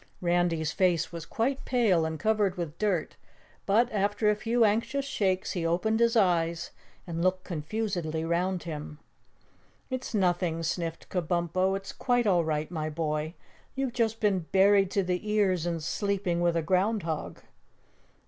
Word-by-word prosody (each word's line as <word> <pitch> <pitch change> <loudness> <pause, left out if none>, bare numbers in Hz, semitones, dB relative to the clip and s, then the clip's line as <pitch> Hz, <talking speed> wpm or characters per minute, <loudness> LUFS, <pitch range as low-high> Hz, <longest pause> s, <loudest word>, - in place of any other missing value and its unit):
Randy's 170 -3 +1
face 180 -3 +1
was 170 -2 -7
quite 265 +4 -1
pale 210 -10 +2
and 160 -1 -4
covered 210 -4 +1
with 170 -2 -5
dirt, 195 -7 -1 0.5
but 220 +5 +4
after 205 +1 +1
a - - +1
few 230 +2 +2
anxious 235 +6 0
shakes 190 -8 0
he 175 - -2
opened 185 +7 +1
his 235 0 +3
eyes 170 -4 +1 0.3
and 170 -1 -4
looked 185 +1 +1
confusedly 170 -2 -3
round 175 +2 0
him. 150 -2 -6 0.9
"It's 255 -2 -3
nothing," 175 -4 +1
sniffed 165 0 -3
Kabumpo. 180 +2 0
"It's 195 0 -8
quite 245 -2 +1
all 180 -5 +3
right, 155 0 -2
my 155 -2 -2
boy. 155 +1 -2 0.4
You've 270 -2 -2
just 225 -2 0
been 190 -6 +1
buried 195 0 +5
to 195 0 +1
the 180 +3 -2
ears 185 -5 +2
and 165 -2 -2
sleeping 190 0 -1
with 170 -1 +2
a 165 - 0
ground 190 +4 +1
hog." 160 -2 -4
185 Hz, 155 wpm, -28 LUFS, 165-210 Hz, 0.9 s, buried